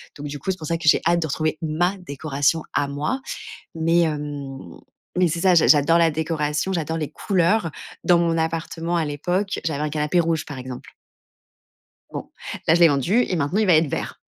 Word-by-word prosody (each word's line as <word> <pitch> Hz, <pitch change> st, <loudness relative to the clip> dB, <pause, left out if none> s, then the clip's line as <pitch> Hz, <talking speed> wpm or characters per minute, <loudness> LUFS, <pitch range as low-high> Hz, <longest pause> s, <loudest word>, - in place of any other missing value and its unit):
Donc 145 Hz, 0 st, -7 dB
du 145 Hz, 0 st, -6 dB
coup, 190 Hz, -, -2 dB
c'est 185 Hz, -, -4 dB
pour 155 Hz, -, -7 dB
ça 165 Hz, -, 0 dB
que 165 Hz, -1 st, -5 dB
j'ai -, -, +6 dB
hâte 170 Hz, 0 st, +3 dB
de 160 Hz, -, -1 dB
retrouver 155 Hz, +1 st, -1 dB
ma 170 Hz, +5 st, 0 dB
décoration 145 Hz, -2 st, -1 dB
à 145 Hz, -, +1 dB
moi. 145 Hz, -, -2 dB, 0.6 s
Mais 165 Hz, +1 st, +2 dB
hem 145 Hz, -, -4 dB, 0.4 s
mais 180 Hz, -1 st, +4 dB
c'est 165 Hz, +1 st, -2 dB
ça, 185 Hz, -1 st, +5 dB
j'a 165 Hz, -, +5 dB
j'adore 150 Hz, +2 st, +5 dB
la 165 Hz, -1 st, +4 dB
décoration, 155 Hz, +2 st, -1 dB
j'adore 165 Hz, -2 st, -2 dB
les 155 Hz, -3 st, -4 dB
couleurs, 190 Hz, +1 st, +1 dB
heu, 160 Hz, -, -6 dB, 0.3 s
dans 175 Hz, -1 st, +4 dB
mon 165 Hz, -1 st, +1 dB
appartement 165 Hz, +1 st, -2 dB
à 165 Hz, -, +1 dB
l'époque, 175 Hz, +7 st, -2 dB
j'avais 150 Hz, -3 st, -1 dB
un 150 Hz, -, -1 dB
canapé 150 Hz, +3 st, 0 dB
rouge, 165 Hz, -2 st, 0 dB
par 145 Hz, -, -8 dB
exemple 125 Hz, -1 st, -8 dB, 1.2 s
bon, -, -, -6 dB, 0.4 s
là, 165 Hz, -, +6 dB
je -, -, +2 dB
l'ai 170 Hz, -, +8 dB
vendu 165 Hz, -, +2 dB
et 180 Hz, -, -1 dB
maintenant, 160 Hz, +6 st, 0 dB
il 215 Hz, -, +2 dB
va 175 Hz, -, +6 dB
être 155 Hz, 0 st, +3 dB
vert. -, -, -5 dB
160 Hz, 210 wpm, -23 LUFS, 150-170 Hz, 1.2 s, l'ai